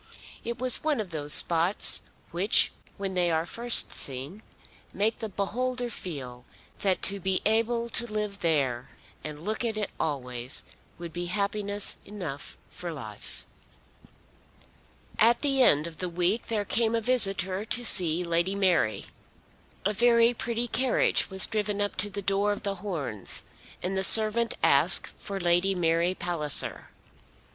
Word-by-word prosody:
It 235 Hz, +1 st, -5 dB
was 255 Hz, -1 st, 0 dB
one 305 Hz, -5 st, 0 dB
of 200 Hz, -5 st, -5 dB
those 150 Hz, -2 st, -3 dB
spots 170 Hz, +6 st, +4 dB, 0.3 s
which 185 Hz, +5 st, +2 dB, 0.3 s
when 195 Hz, -1 st, -4 dB
they 180 Hz, -1 st, 0 dB
are 160 Hz, 0 st, -1 dB
first 235 Hz, +6 st, +4 dB
seen 140 Hz, +10 st, -2 dB, 0.5 s
make 215 Hz, +3 st, -1 dB
the 220 Hz, -2 st, -5 dB
beholder 245 Hz, +5 st, -3 dB
feel 130 Hz, -, -8 dB, 0.4 s
that 190 Hz, -2 st, +1 dB
to 200 Hz, +1 st, +1 dB
be 190 Hz, 0 st, 0 dB
able 230 Hz, +2 st, 0 dB
to 235 Hz, 0 st, -3 dB
live 210 Hz, -2 st, -4 dB
there 135 Hz, -8 st, -1 dB, 0.3 s
and 150 Hz, 0 st, -8 dB
look 215 Hz, +3 st, -3 dB
at 225 Hz, -2 st, -3 dB
it 210 Hz, -, -3 dB
always 125 Hz, -3 st, -4 dB, 0.3 s
would 170 Hz, -1 st, -9 dB
be 175 Hz, 0 st, -5 dB
happiness 205 Hz, +1 st, -2 dB
enough 180 Hz, -9 st, -8 dB
for 175 Hz, -1 st, -7 dB
life. 110 Hz, -9 st, -10 dB, 1.7 s
At 235 Hz, +5 st, +3 dB
the 275 Hz, -2 st, +2 dB
end 150 Hz, -, +4 dB
of 165 Hz, -2 st, -9 dB
the 180 Hz, -, -3 dB
week 180 Hz, +6 st, -1 dB
there 210 Hz, -3 st, -2 dB
came 230 Hz, +2 st, 0 dB
a -, -, +1 dB
visitor 195 Hz, -5 st, +1 dB
to 245 Hz, +2 st, -2 dB
see 175 Hz, -4 st, +3 dB
Lady 170 Hz, +3 st, 0 dB
Mary. 180 Hz, -, 0 dB, 0.8 s
A 210 Hz, -, +1 dB
very 235 Hz, +2 st, +3 dB
pretty 235 Hz, +1 st, -3 dB
carriage 255 Hz, +2 st, +1 dB
was 190 Hz, -1 st, +5 dB
driven 210 Hz, -1 st, -3 dB
up 205 Hz, 0 st, -2 dB
to 205 Hz, -, -1 dB
the 200 Hz, 0 st, -7 dB
door 200 Hz, +2 st, 0 dB
of 205 Hz, -, -5 dB
The 200 Hz, -1 st, -4 dB
Horns, 145 Hz, -, -2 dB, 0.4 s
and 185 Hz, +2 st, -3 dB
the 190 Hz, -, -1 dB
servant 220 Hz, +3 st, +8 dB
asked -, -, +4 dB
for 195 Hz, -1 st, -6 dB
Lady 175 Hz, +2 st, +1 dB
Mary 170 Hz, +1 st, 0 dB
Palliser. 170 Hz, -6 st, -1 dB
195 Hz, 150 wpm, -26 LUFS, 170-220 Hz, 1.7 s, servant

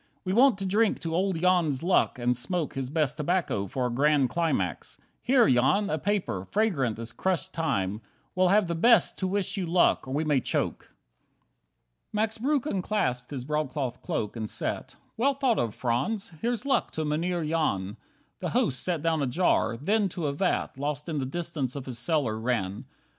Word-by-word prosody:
We 185 Hz, -, 0 dB
want 250 Hz, 0 st, +5 dB
to 195 Hz, -, -4 dB
drink 210 Hz, +3 st, +2 dB
to 165 Hz, -1 st, -3 dB
old 185 Hz, 0 st, 0 dB
Jan's 170 Hz, -6 st, +2 dB
luck, 180 Hz, -6 st, +2 dB
and 125 Hz, 0 st, +1 dB
smoke 165 Hz, +6 st, -3 dB
His 135 Hz, -1 st, -4 dB
best 150 Hz, -1 st, 0 dB
tobacco 155 Hz, -, 0 dB
for 125 Hz, +6 st, -2 dB
a 125 Hz, -, -1 dB
grand 140 Hz, 0 st, +2 dB
climax. 140 Hz, -, -1 dB, 0.2 s
Here, 250 Hz, -1 st, +4 dB
Jan, 135 Hz, +12 st, +3 dB
a 155 Hz, -, 0 dB
paper, 190 Hz, -, -1 dB
fragrant 160 Hz, -, +1 dB
as 115 Hz, 0 st, -6 dB
crushed 180 Hz, +3 st, -1 dB
thyme, 105 Hz, -, -1 dB, 0.3 s
We'll 185 Hz, 0 st, +3 dB
have 205 Hz, +2 st, +4 dB
the 170 Hz, -, -2 dB
best 230 Hz, +7 st, +4 dB
to 190 Hz, -, 0 dB
wish 200 Hz, +1 st, -1 dB
you 185 Hz, -3 st, -2 dB
luck, 170 Hz, -4 st, +3 dB
or 130 Hz, -, -4 dB
may 155 Hz, -, +1 dB
we 145 Hz, -4 st, +2 dB
choke!" -, -, -2 dB
5 -, -, -27 dB, 1.2 s
Max 220 Hz, +1 st, 0 dB
Breuck 275 Hz, +2 st, +1 dB
unclasped 180 Hz, -, -1 dB
his 130 Hz, -4 st, -5 dB
broadcloth 140 Hz, -4 st, -2 dB
cloak, 105 Hz, +1 st, -3 dB
and 110 Hz, -2 st, -4 dB
sat. -, -, -4 dB, 0.2 s
"Well 275 Hz, +4 st, +2 dB
thought 260 Hz, -4 st, +1 dB
of, 115 Hz, -3 st, -1 dB
Franz; 135 Hz, -, -1 dB
here's 240 Hz, +1 st, -1 dB
luck 275 Hz, -, +1 dB
to 155 Hz, -, -2 dB
Mynheer 165 Hz, +3 st, -1 dB
Jan." 115 Hz, -11 st, -1 dB, 0.4 s
The -, -, -2 dB
host 130 Hz, -, +1 dB
set 170 Hz, -4 st, -2 dB
down 165 Hz, -2 st, +1 dB
a 140 Hz, -, +1 dB
jar; 125 Hz, -6 st, +1 dB
then 200 Hz, -, +1 dB
to 170 Hz, -2 st, -4 dB
a 140 Hz, -, 0 dB
vat 165 Hz, -4 st, -1 dB
Lost 145 Hz, +2 st, -3 dB
in 155 Hz, -3 st, -1 dB
the 130 Hz, -, -2 dB
distance 150 Hz, -4 st, -3 dB
of 140 Hz, -2 st, -5 dB
his 125 Hz, -3 st, -6 dB
cellar, 120 Hz, -5 st, 0 dB
ran. 110 Hz, -5 st, -2 dB
155 Hz, 190 wpm, -27 LUFS, 125-190 Hz, 1.2 s, want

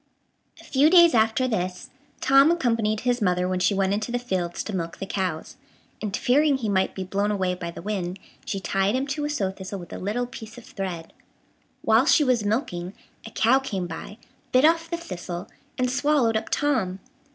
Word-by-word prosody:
A -, -, -14 dB
few 285 Hz, +3 st, +3 dB
days 345 Hz, -1 st, +7 dB
after 225 Hz, +3 st, +3 dB
this, 185 Hz, -6 st, -3 dB, 0.3 s
Tom 275 Hz, +3 st, +6 dB
accompanied 230 Hz, -9 st, +1 dB
his 245 Hz, -1 st, 0 dB
mother 180 Hz, -2 st, +1 dB
when 185 Hz, 0 st, -1 dB
she 180 Hz, +2 st, +2 dB
went 195 Hz, 0 st, +1 dB
into 215 Hz, +3 st, -2 dB
the 245 Hz, -, 0 dB
fields 185 Hz, -8 st, -3 dB
to 210 Hz, -, -5 dB
milk 170 Hz, -2 st, -4 dB
the 195 Hz, -, -5 dB
cows, 185 Hz, -5 st, -3 dB, 0.4 s
and, 210 Hz, -3 st, -2 dB
fearing 285 Hz, +2 st, +3 dB
he 225 Hz, -5 st, -3 dB
might 190 Hz, -1 st, +1 dB
be 190 Hz, -, -3 dB
blown 200 Hz, +2 st, -1 dB
away 190 Hz, -3 st, 0 dB
by 180 Hz, -1 st, -5 dB
the 170 Hz, -, -9 dB
wind, 190 Hz, -3 st, -3 dB, 0.3 s
she 195 Hz, -, -3 dB
tied 195 Hz, +3 st, 0 dB
him 260 Hz, +1 st, 0 dB
to 290 Hz, +1 st, -3 dB
a -, -, -2 dB
sow 205 Hz, -11 st, -1 dB
thistle 190 Hz, +1 st, -7 dB
with 175 Hz, -3 st, -10 dB
a -, -, -6 dB
little 215 Hz, +6 st, -1 dB
piece 230 Hz, -1 st, -10 dB
of 245 Hz, -, -11 dB
thread. 180 Hz, -5 st, -6 dB, 0.7 s
While 225 Hz, +6 st, +4 dB
she 305 Hz, -, +5 dB
was 250 Hz, -5 st, +2 dB
milking, 205 Hz, -, -2 dB, 0.3 s
a -, -, -7 dB
cow 235 Hz, +4 st, +3 dB
came 200 Hz, -9 st, -3 dB
by, 175 Hz, +5 st, -8 dB, 0.3 s
bit 255 Hz, +3 st, +5 dB
off 330 Hz, +1 st, +3 dB
the 340 Hz, -, -2 dB
thistle, 180 Hz, -, -6 dB, 0.3 s
and 255 Hz, -, +1 dB
swallowed 260 Hz, -3 st, +2 dB
up 220 Hz, -, -2 dB
Tom. 225 Hz, -11 st, 0 dB
215 Hz, 200 wpm, -25 LUFS, 185-255 Hz, 0.7 s, days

